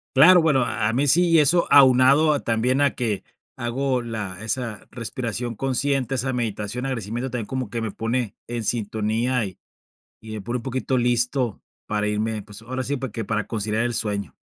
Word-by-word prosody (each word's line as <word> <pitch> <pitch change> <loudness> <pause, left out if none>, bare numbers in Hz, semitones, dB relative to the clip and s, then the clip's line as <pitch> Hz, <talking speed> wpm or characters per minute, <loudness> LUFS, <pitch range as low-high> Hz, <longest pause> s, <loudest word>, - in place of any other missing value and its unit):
Claro, 175 +6 +8
bueno, 150 -5 +3
a 115 -3 -1
a 115 - 0
mí 140 +3 +1
si 165 +2 +5
eso 170 +4 +4
aunado 135 +3 +6
a 145 - +1
también, 120 +4 0
a 140 -1 +2
que 110 -6 -2 0.3
hago 125 +2 -1
la 105 -5 -5
esa 115 -3 -3
respiración 120 -1 -4
consciente, 135 +1 0
esa 130 +2 -1
meditación, 115 0 -3
agradecimiento 120 0 -3
también 115 -3 -4
como 130 -5 -3
que 115 -1 -3
me 110 -3 -3
pone 115 -1 -2
en 120 -1 -3
sintonía, 110 +3 0
y 95 -3 -7 0.6
y 110 0 -11
me 105 - -5
pone 120 +5 -3
un - - -9
poquito 130 0 -1
listo 120 -1 +1 0.3
para 105 0 -1
irme, 105 0 -1
pues, 105 +2 -11
ahora 130 +2 -4
sí, 145 +1 -1
pues, 130 -3 -5
que 110 0 -4
para 110 0 -2
conciliar 110 0 -1
el 120 0 -1
sueño. 105 -3 -2
120 Hz, 185 wpm, -23 LUFS, 110-130 Hz, 0.6 s, Claro